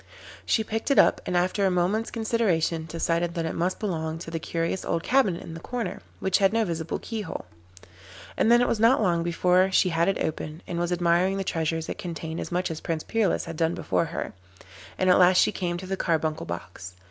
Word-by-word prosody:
She 220 - +2
picked 225 +3 -3
it 275 - +3
up, - - +5
and 180 - +1
after 185 +3 +1
a 195 - +4
moment's 185 +5 0
consideration 185 -8 0
decided 170 +1 -1
that 165 -1 -1
it 160 - -2
must 180 +2 -1
belong 160 -6 -2
to 165 0 -8
the 165 - -2
curious 165 +3 -2
old 165 0 -1
cabinet 245 -10 +2
in 165 - -8
the 165 - -7
corner, 225 -1 -4 0.2
which 190 -1 +1
had 195 -1 +4
no 225 0 +1
visible 165 -2 -3
keyhole. 215 - -5 0.9
And 225 - +3
then 240 +1 +6
it - - +1
was 225 - 0
not 230 +5 +5
long 170 -3 +2
before 180 +2 +2
she 185 0 +3
had 165 0 +1
it 195 - +1
open, 155 +1 -4
and 170 - -4
was 175 0 -1
admiring 175 +2 +2
the 195 - -1
treasures 165 -2 -2
it - - -5
contained 165 -2 -5
as - - -5
much 180 0 -1
as 160 - -6
Prince 160 -2 -3
Peerless 225 -5 0
had 165 -1 -7
done 165 +1 +1
before 165 0 0
her, 165 - -5 0.6
and 185 - +1
at 180 - +6
last 180 0 +6
she - - +4
came 175 -2 -2
to 185 - -7
the 195 +1 -2
carbuncle 160 -3 -1
box. 85 +1 -7
175 Hz, 220 wpm, -26 LUFS, 165-195 Hz, 0.9 s, then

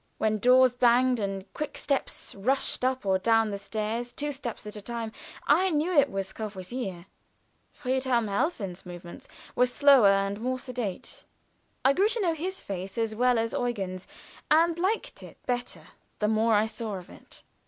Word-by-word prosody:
When 215 -1 +1
doors 255 +2 +6
banged 245 0 +4
and 195 -2 -3
quick 300 -1 -4
steps 280 -2 -2
rushed 250 +6 0
up 260 -2 0
or 190 -1 +2
down 225 +1 +3
the 200 - -4
stairs 220 +4 -3
two 295 0 -3
steps 250 -5 -6
at 210 - -7
a 210 - -7
time 230 +1 -5 0.3
I 355 +6 +4
knew 320 +2 0
it 285 -2 +5
was 195 -3 -4
Courvoisier. 195 -2 -5 0.7
Friedhelm 255 -3 0
Helfen's 200 - -2
movements 175 -1 -10 0.3
were 250 - +4
slower 270 -3 +6
and 195 +1 +2
more 255 +2 -1
sedate. 250 -7 -5 0.6
I 270 - +6
grew 390 +7 +3
to 465 +2 -2
know 345 -4 +2
his 365 +5 -4
face 190 +1 -6
as 225 -1 0
well 245 +2 +3
as 225 0 -1
Eugen's, 195 -7 -3 0.4
and 330 +2 +4
to - - -4
like 415 +5 -1
it - - -12
better 245 0 -3 0.3
the 210 - 0
more 220 +1 +3
I 210 +1 +4
saw 220 -2 -4
of 180 -2 -9
it. - - -16
235 Hz, 175 wpm, -28 LUFS, 200-260 Hz, 0.7 s, doors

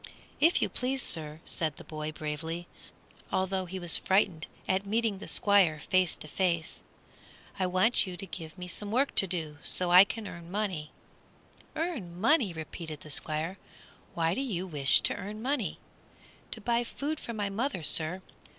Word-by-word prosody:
"If 330 +3 +4
you - - +2
please, 260 +1 -2
sir," 155 -1 -4
said 160 -2 -2
the - - -11
boy, 155 0 -5
bravely, 160 +3 -5 0.6
although 190 0 0
he 190 +2 -5
was 175 -3 +3
frightened 190 -5 +2 0.2
at 190 +1 +1
meeting 215 0 0
the - - -8
Squire 195 -7 +4
face 185 +2 +2
to - - -10
face, 170 -1 -1 0.8
"I 185 - +2
want 185 +5 +3
you 180 -1 -6
to 195 - -5
give 160 -1 -8
me 180 0 -6
some 205 +3 -3
work 260 +6 +2
to 195 - +7
do, 160 -5 -3
so 180 -1 +1
that - - +2
I 180 +2 +11
can 215 +1 -5
earn 170 -1 -9
money." 185 -6 -2 0.9
"Earn 240 - -3
money!" 230 - +4
repeated 160 -1 -7
the 155 - -7
Squire, 155 +6 -2 0.6
"why 165 0 +2
do 265 - -1
you 195 -9 -2
wish 145 -7 +4
to - - +4
earn 205 +2 -6
money?" 255 -1 -1 0.7
"To - - -6
buy 240 -1 +1
food 295 +5 -4
for 235 - -6
my 205 -2 -2
mother, 220 - -2
sir. 165 +5 +2
185 Hz, 175 wpm, -30 LUFS, 165-210 Hz, 0.9 s, I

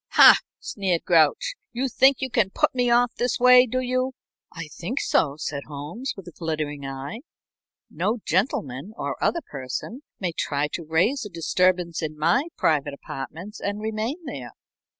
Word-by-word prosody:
"Hah!" - - +9 0.2
sneered 185 -5 -1
Grouch. 175 - +3 0.2
"You 255 +3 -1
think 265 +2 +4
you 260 -1 -2
can 205 -5 +2
put - - +1
me 245 -1 +1
off 240 0 +3
this 245 +1 +1
way, 250 0 +7
do 255 +2 -1
you?" 255 +1 -1 0.4
"I 165 -2 -7
think 205 - -4
so," 140 -2 +1
said 145 -2 -4
Holmes, 155 - -5
with 190 -2 -10
a - - -8
glittering 155 -4 -4
eye. 135 +10 -6 0.7
"No 195 +9 -1
gentleman 190 - -1
or - - -4
other 340 - +1
person 140 - -6 0.2
may 180 -3 -1
try 145 -2 -1
to 170 - -5
raise 175 - +1
a 210 - -7
disturbance 175 0 +1
in 155 -1 -4
my 170 - +2
private 145 -2 +1
apartments 165 +10 -8
and 205 +1 -3
remain 220 +10 -3
there." 130 - -7
185 Hz, 165 wpm, -24 LUFS, 155-245 Hz, 0.7 s, Hah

